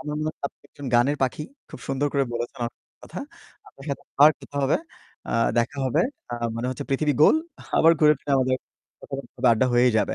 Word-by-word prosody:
আমার 150 -2 -5
মনে 155 - -1
হয় - - -67
আপনি - - -14
একজন 145 -1 -10
গানের 125 +5 +4
পাখি। 130 +3 -1 0.3
খুব - - -10
সুন্দর 135 +2 0
করে 140 -1 +2
বলেছেন, 120 0 -4
অনেক 115 - -12 0.2
কথা। - - -7 0.5
আপনার 135 - -15
সাথে 140 - -4 0.2
আবার 150 +2 +9
কথা 145 - -11
হবে, 135 - +3 0.5
আ - - -3 0.3
দেখা 140 +5 0
হবে। 150 +6 +2 0.3
আ - - 0 0.2
মানে 120 - -2
হচ্ছে 130 - -5
পৃথিবী 145 +2 +2
গোল, 155 - +7 0.4
আবার 165 +1 +7
ঘুরে 150 -1 +6
ফিরে 145 - -3
আমাদের 130 -1 +2 0.5
কথাবার্তা, 135 0 -8
বা 125 - +7
আড্ডা 115 +3 +2
হয়েই 120 +1 +5
যাবে। - - 0
135 Hz, 205 wpm, -24 LUFS, 125-150 Hz, 0.5 s, আবার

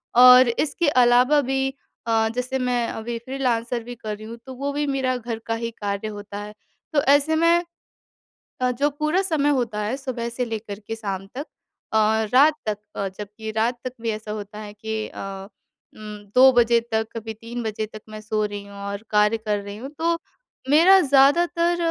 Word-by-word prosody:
और 250 +1 +9
इसके 295 +6 0 0.2
अलावा 250 +5 +5
भी 270 0 0 0.4
अ, 225 -1 +2
जैसे 250 +1 -2
मैं 245 -2 0
अभी 230 +1 -4
फ्रीलांसर 245 -3 -1
भी 245 +1 -8
कर 215 -2 -5
रही 215 - -10
हूँ 230 +1 -8
तो 260 - -8
वो 280 +2 -3
भी 295 +1 -1
मेरा 265 -2 0
घर 230 -1 -5
का 225 - 0
ही 230 0 -4
कार्य 200 +1 -2
होता 205 -1 -7
है। 210 0 -8 0.4
तो 285 - +4
ऐसे 290 +2 +3
में 335 +2 +4 1.0
अ, 250 0 +2
जो 285 +4 +1
पूरा 305 +6 0
समय 310 -6 +1
होता 220 -3 -3
है 220 +6 -2
सुबह 255 -4 -4
से 245 +1 -2
लेकर 220 -3 -6
के 225 - -4
शाम 195 -3 -4
तक 290 +4 -4 0.5
अ, 220 0 +3
रात 295 +4 +6
तक 210 -1 -1 0.2
अ, 195 - -1
जबकि 210 +2 -7
रात 235 +2 +1
तक 255 - -4
भी 230 0 -1
ऐसा 215 0 -5
होता 210 0 -7
है 210 -1 -8
कि 220 +1 -4
अ, - - -10 0.8
उम, 215 -1 -8 0.2
2 260 +1 +8
बजे 235 -1 +4
तक 220 0 +1
कभी 225 0 -5
3 235 +2 -7
बजे 215 0 -3
तक 215 0 -11
मैं 215 0 -8
सो 215 0 -1
रही 205 -1 -5
हूँ 200 0 -12
और 200 +1 -5
कार्य 210 +1 +3
कर 210 -1 -1
रही 200 0 -8
हूँ 260 +4 -7
तो 335 +1 +1 0.5
मेरा 345 +6 +7
ज़्यादातर 335 +5 +3
235 Hz, 195 wpm, -23 LUFS, 215-270 Hz, 1.0 s, और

